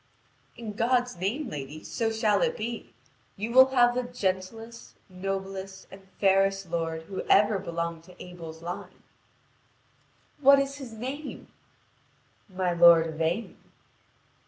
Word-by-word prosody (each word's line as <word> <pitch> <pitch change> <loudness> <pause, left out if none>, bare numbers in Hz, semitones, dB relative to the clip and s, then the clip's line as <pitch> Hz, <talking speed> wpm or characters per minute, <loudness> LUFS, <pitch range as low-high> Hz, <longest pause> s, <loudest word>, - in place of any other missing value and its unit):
'" - - -35
"In 225 -3 -6
God's 245 0 +1
name, 225 - -2
lady, 145 +2 -7
so 225 -1 -1
shall 215 -2 +1
it - - +1
be. 230 +2 -5 0.5
You 215 +4 -3
will 260 +2 +8
have 245 -2 +4
the 250 - 0
gentlest, 225 0 -4
noblest, 190 +1 -5
and 195 0 -14
fairest 195 -2 +2
lord 165 -1 -2
who 190 +3 -5
ever 205 0 +5
belonged 170 -1 -4
to 180 - -17
Abel's 165 -2 -10
line." 175 +1 -7 1.4
"What 280 0 +7
is 275 0 -1
his 265 -5 -8
name?" 265 +7 -7 1.0
"My 185 -2 -1
lord 170 -1 +7
Yvain." 165 +7 -2
195 Hz, 130 wpm, -27 LUFS, 175-235 Hz, 1.4 s, will